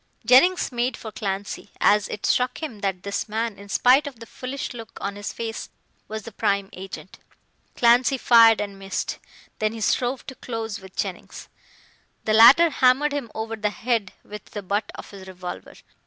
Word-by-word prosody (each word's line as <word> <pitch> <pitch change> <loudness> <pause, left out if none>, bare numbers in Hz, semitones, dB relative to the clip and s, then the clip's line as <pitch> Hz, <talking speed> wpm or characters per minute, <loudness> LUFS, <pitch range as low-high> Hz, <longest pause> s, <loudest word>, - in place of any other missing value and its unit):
Jennings 270 +11 +5
made 240 0 -1
for 220 - -8
Clancy, 200 -1 -4
as 210 0 +4
it 210 - -5
struck 250 +5 0
him 245 -9 -5
that 190 -3 -2
this 200 +2 -3
man, 220 -1 -2
in 200 0 -12
spite 255 +7 +4
of 260 -5 -9
the 230 - -9
foolish 255 +4 -6
look 230 -2 -10
on 200 0 -4
his 205 0 -5
face, 225 -1 -5 0.4
was 220 0 -6
the 230 - -9
prime 200 -2 -1
agent. 190 0 -9 0.6
Clancy 245 +3 +4
fired 230 -3 +6
and 200 -1 -5
missed. 195 0 -4 0.4
Then 215 0 0
he 225 - -7
strove 245 +4 0
to 265 - -7
close 225 -4 -5
with 190 -1 -14
Jennings. - - -5 0.8
The 215 - +1
latter 275 +10 +8
hammered 265 +3 +3
him 280 -5 -3
over 220 +1 -4
the 210 -1 -1
head 220 -2 -1
with 210 -1 -10
the 205 - -8
butt 205 +2 -2
of - - -10
his 195 -2 -11
revolver. 180 -1 -8
220 Hz, 180 wpm, -24 LUFS, 200-250 Hz, 0.8 s, latter